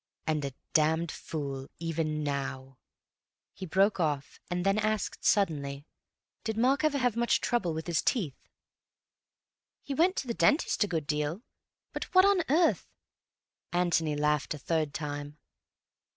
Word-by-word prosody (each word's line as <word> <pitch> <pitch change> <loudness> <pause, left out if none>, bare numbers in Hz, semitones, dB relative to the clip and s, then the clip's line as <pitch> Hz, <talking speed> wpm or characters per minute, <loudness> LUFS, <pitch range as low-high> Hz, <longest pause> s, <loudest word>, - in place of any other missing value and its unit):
"And 155 -2 0
a 135 -2 -4 0.2
damned 160 +1 +2
fool. 140 -4 -5
Even 160 -2 -2
now—" 135 -2 -4 0.7
He 190 - -7
broke 195 +4 +3
off 150 -4 -1
and 180 +1 -2
then 195 +2 +3
asked 215 -1 -1
suddenly, 145 -8 +1 0.6
"Did 220 -1 -3
Mark 265 +5 +3
ever 305 -2 +2
have 245 -4 +1
much 235 0 +2
trouble 185 -10 0
with 160 - -4
his 170 -3 +1
teeth?" 170 - -1 1.4
"He 280 - -4
went 350 +7 +3
to 265 - -3
his 235 - -3
dentist 295 -6 +3
a - - -1
good 165 -6 -2
deal. 150 +7 -2 0.5
But - - -3
what 370 +1 +8
on 400 -2 +4
earth—" 325 +4 +3 0.8
Antony 170 -3 +1
laughed 150 0 0
a - - -7
third 155 0 -1
time. 145 -1 -5
165 Hz, 145 wpm, -30 LUFS, 150-215 Hz, 1.4 s, what